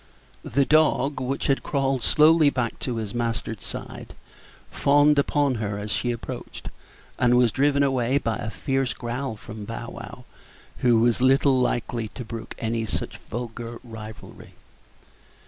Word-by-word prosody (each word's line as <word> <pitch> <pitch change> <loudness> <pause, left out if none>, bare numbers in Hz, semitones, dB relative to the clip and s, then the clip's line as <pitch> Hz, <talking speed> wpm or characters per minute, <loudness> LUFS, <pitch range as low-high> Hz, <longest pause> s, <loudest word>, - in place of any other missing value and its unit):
The 140 -1 +1
dog, 150 -2 +3
which 130 +2 -2
had 135 - +2
crawled 135 -2 0
slowly 155 +3 +5
back 125 -4 -2
to 125 - -3
his 110 -3 -4
master's 115 -3 -3
side, - - -8 0.6
fawned 145 +1 +4
upon 140 -1 +2
her 100 -1 -2
as 105 +1 -5
she 120 - 0
approached, 115 - -7 0.5
and 125 -1 +4
was 125 -2 +4
driven 140 +2 +2
away 130 -1 +2
by 115 -5 -1
a 110 - -4
fierce 135 +2 -1
growl 120 +1 -4
from 105 0 -9
Bow 115 +2 -6
wow, 120 +2 -10 0.5
who 120 -2 +4
was 120 +1 +2
little 135 +1 +4
likely 120 -2 -1
to 125 +3 -8
brook 115 0 -7
any 115 0 -2
such 90 - -4
vulgar 115 0 -6
rivalry. 110 -3 -11
120 Hz, 145 wpm, -25 LUFS, 115-135 Hz, 0.6 s, slowly